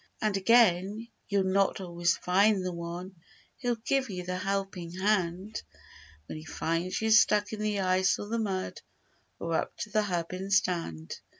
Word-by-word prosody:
And 215 -2 0
again, 210 0 +3 0.2
you'll 200 -2 +2
not 195 +1 +2
always 175 -2 0
find 195 +1 +3
the 185 - -1
one 170 +2 -6 0.4
Who'll 245 -2 +1
give 265 +3 0
you 180 -2 -4
the 180 0 -2
helping 195 -3 -3
hand 190 0 0 0.6
When 155 - -7
he - - -10
finds 165 +5 -2
you 220 - +2
stuck 210 -1 +5
in 215 - -4
the 210 -2 0
ice 185 0 +2
or 205 - -6
the 230 +2 -1
mud 190 -4 -3 0.6
Or - - -3
up - - -1
to - - -5
the 215 - +3
hub 175 -4 -2
in 190 +1 -5
sand. 170 - 0
190 Hz, 170 wpm, -29 LUFS, 180-210 Hz, 0.6 s, stuck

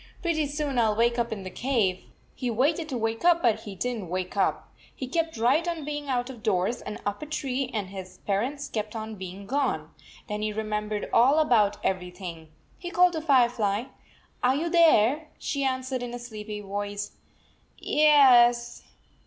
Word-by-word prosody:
" - - -27
Pretty 315 -4 +1
soon 285 -3 -2
I 230 - +4
11 215 -1 +1
wake 235 +1 +2
up 235 0 -1
in 205 -3 -4
the 185 - -7
cave." 220 -8 0 0.3
He 250 - -3
waited 300 +8 +1
to 260 - -2
wake 225 0 -2
up, 345 -1 +4
but 235 -3 +3
he 200 -2 -7
did 245 +6 -2
n - - -5
t 185 - -8
wake 185 +2 -4
up. 200 - 0 0.2
He 260 - -5
kept 325 +2 -2
right 265 +9 +2
on 335 -4 -3
being 295 -1 -4
out 245 -2 0
of 240 -4 -12
doors 210 +1 0
and 210 - -6
up 205 0 -2
a 305 - -6
tree, 270 -3 -2
and 205 -5 -3
his 190 -2 -9
parents 255 +9 -1
kept 215 0 -4
on 220 0 -5
being 190 0 -8
gone. 220 - -1 0.4
Then 210 0 -3
he 215 0 -1
remembered 210 -1 -3
all 260 +6 +5
about 230 -10 +3
everything. 180 -3 -4 0.3
He 350 - -6
called 360 0 +4
to 320 - -2
Firefly, 240 -8 +2 0.6
"Are 255 +1 +3
you 330 +4 -1
there?" 310 -4 +4
She 280 -2 -2
answered 260 -1 -1
in 245 0 -5
a - - -4
sleepy 215 -3 -7
voice, 205 +1 -4 0.7
"Yes." 245 -6 +5
240 Hz, 190 wpm, -27 LUFS, 210-280 Hz, 0.7 s, all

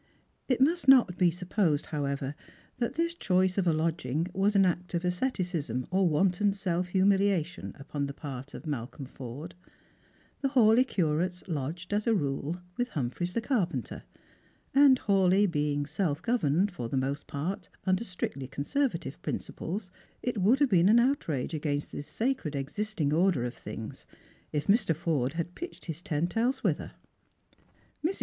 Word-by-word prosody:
It 255 -3 +2
must 320 +4 +3
not 250 -9 +7
be 180 -2 +5
sujoposed, 180 -3 0
however, 140 -2 -2 0.5
that 235 - -1
this 335 +1 0
choice 185 - +1
of 185 - +1
a - - +5
lodging 160 -1 0
was 200 +2 +2
an 195 -1 +6
act 180 0 -1
of 170 +1 -1
asceticism 180 - -1
or 190 -1 +3
wanton 190 +5 +2
self 180 -3 -1
humiliation 190 -2 +1
upon 140 0 -3
the 140 - -6
part 135 -2 -7
of - - -9
Malcolm 135 -1 -4
Forde. 135 +7 -8 0.9
The 275 - +1
Hawleigh 250 -1 +5
curates 175 -1 0
lodged, 170 +4 -4
as 210 +2 0
a 230 - +4
rule, 145 0 -1 0.2
with 245 - 0
Humphreys 160 - -3
the 230 - +1
carpenter: 180 - -1 0.7
and 275 -1 +7
Hawleigh 195 0 +4
being 145 -4 0
self 150 0 -1
governed, 200 - +2
for 120 -10 -5
the 135 - -1
most 135 +2 -2
part, 160 +7 -4
upon 185 -1 +2
strictly 175 - -4
conservative 160 - -2
principles, 185 +2 -4 0.3
it 245 -4 -1
would 210 +8 +4
have 285 - +5
been 180 0 +5
an 225 - +7
outrage 235 - +1
against 145 -2 -2
the - - -5
sacred 220 - -2
existing 155 +2 -2
order 170 -6 +3
of 120 - -3
things - - -8 0.4
if 150 -1 -1
Mr. 200 -5 +3
Forde 145 -5 0
had 170 +1 -3
pitched 350 - -7
his 165 -1 -5
tent 170 -1 -2
else 250 +4 +1
whithc". - - 0 1.1
Mrs. 350 +5 0
180 Hz, 155 wpm, -29 LUFS, 145-205 Hz, 1.1 s, not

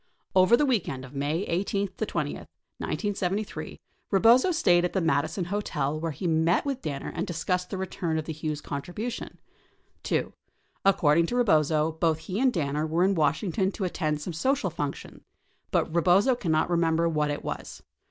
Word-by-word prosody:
Over 185 +5 +6
the 295 - +3
weekend 175 - -1
of 130 - -13
May 145 +6 -1
18 195 +2 -1
20, 200 +3 -3
1973, 205 0 -4 0.3
Rebozo 230 - +5
stayed 175 - +3
at 180 - -1
the 190 - +1
Madison 165 +2 0
Hotel 155 -7 -2
where 165 +1 -2
he 150 +6 -7
met 165 - +2
with 275 -2 -2
Danner 140 -2 -4
and - - -3
discussed 180 +1 -2
the 195 - -4
return 175 -3 -2
of 155 - -2
the 160 - -4
Hughes 155 -1 -4
contribution. 180 - -5 0.6
2. - - -1 0.5
According 170 -4 +4
to 245 - -3
Rebozo, 155 - +3
both 160 0 +1
he 185 +5 -5
and 260 0 +4
Danner 150 -4 -1
were 165 +3 +1
in 195 +1 +3
Washing 160 +3 +1
ton 190 +1 +1
to 200 - -4
attend 155 -4 -1
some 175 +3 -5
social 245 - 0
function 145 -2 -5 0.5
but - - 0
Rebozo 185 +9 +4
cannot 165 -7 0
remember 170 -1 +2
what 150 -2 0
it 145 - -3
was. - - -6
170 Hz, 170 wpm, -27 LUFS, 155-195 Hz, 0.6 s, Over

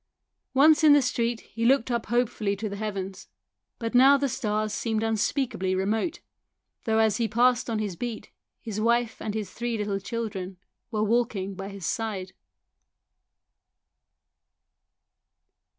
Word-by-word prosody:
Once 305 +3 +6
in 300 -2 +8
the 290 - +6
street 235 -2 -1
he 230 - -6
looked 255 0 +3
up 235 -1 -1
hopefully 225 -3 0
to 215 +2 -4
the 200 - -5
heavens; 195 -2 -5 0.5
but 230 0 -4
now 265 +3 +7
the 280 0 0
stars 215 -3 -1
seemed 220 -2 -1
unspeakably 225 -3 0
remote, 220 - -1 0.6
though 220 -1 +2
as 220 -2 +3
he 230 -2 +1
passed 245 +2 +2
along 225 - 0
his 210 -4 -3
beat 235 +4 -6 0.3
his 215 -3 -4
wife 235 0 +1
and 215 -1 -3
his 210 -4 -4
three 240 -1 -3
little 205 -2 -2
children 195 -3 -5 0.3
were 215 -2 -1
walking 215 -3 0
by 195 +1 -6
his 195 -3 -7
side. 215 -5 -3
225 Hz, 140 wpm, -26 LUFS, 205-240 Hz, 0.6 s, in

